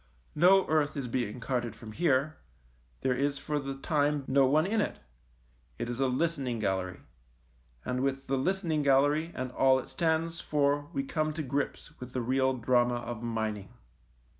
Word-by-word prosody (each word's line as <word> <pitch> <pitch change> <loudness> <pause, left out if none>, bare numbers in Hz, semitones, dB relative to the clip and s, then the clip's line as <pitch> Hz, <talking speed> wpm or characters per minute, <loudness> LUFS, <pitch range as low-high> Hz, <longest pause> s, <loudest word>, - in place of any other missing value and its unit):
No 190 +4 +5
earth 155 -1 +1
is 135 -3 -3
being 120 -1 -2
carted 120 -2 -2
from 110 -1 -10
here, 145 +1 +1 0.6
there 130 - +2
is 140 +2 0
for 150 +1 -2
the 135 -1 -5
time 145 0 0
no 135 0 +4
one 155 +4 +3
in 215 +3 +1
it; - - -2 0.8
it - - -3
is 120 +1 -4
a 135 - +3
listening 130 -2 -1
gallery, 95 -4 -2 0.8
and 125 0 -1
with 135 0 -1
the 135 - 0
listening 165 +2 0
gallery 145 +4 +3
and 130 0 -4
all 130 +1 +4
it 130 - -6
stands 165 -1 0
for 145 0 +1
we 275 - -2
come 155 - -1
to 155 0 -3
grips 140 +2 -3
with 125 0 -9
the 125 - -1
real 130 +2 +2
drama 120 0 +2
of 120 -1 -5
mining. 110 -4 -3
135 Hz, 170 wpm, -30 LUFS, 125-155 Hz, 0.8 s, No